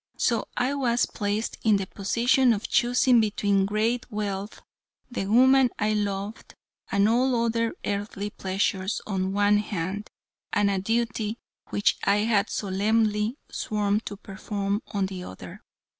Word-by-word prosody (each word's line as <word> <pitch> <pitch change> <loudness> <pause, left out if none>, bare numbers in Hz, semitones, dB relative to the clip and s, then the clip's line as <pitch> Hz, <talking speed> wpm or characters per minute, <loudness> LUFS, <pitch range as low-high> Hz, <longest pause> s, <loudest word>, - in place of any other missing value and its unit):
So 230 -3 +1
I 255 +3 +1
was 245 -3 +1
placed 210 +1 -3
in 215 -2 +4
the 195 - -3
position 235 +6 +2
of 210 0 -4
choosing 245 +1 +4
between 200 -2 +1
great 225 +4 -1
wealth, 205 -1 -4 0.5
the 195 -6 -3
woman 260 +4 +5
I 215 0 +1
loved, 205 0 -3 0.4
and 200 +1 +3
all 240 +1 +2
other 230 0 0
earthly 205 0 -3
pleasures 190 +1 -1
on 195 -3 -2
the - - -1
one 205 +1 +3
hand, 200 0 -4 0.4
and 205 -1 +2
a 195 - 0
duty 225 +1 -1 0.3
which 205 - +1
I 200 +1 +3
had 215 -2 +2
solemnly 210 +3 0
sworn 210 -1 0
to 205 - -6
perform, 200 +1 -3
on 200 -3 -1
the 190 -1 -6
other. 95 - -10
210 Hz, 145 wpm, -26 LUFS, 200-230 Hz, 0.5 s, woman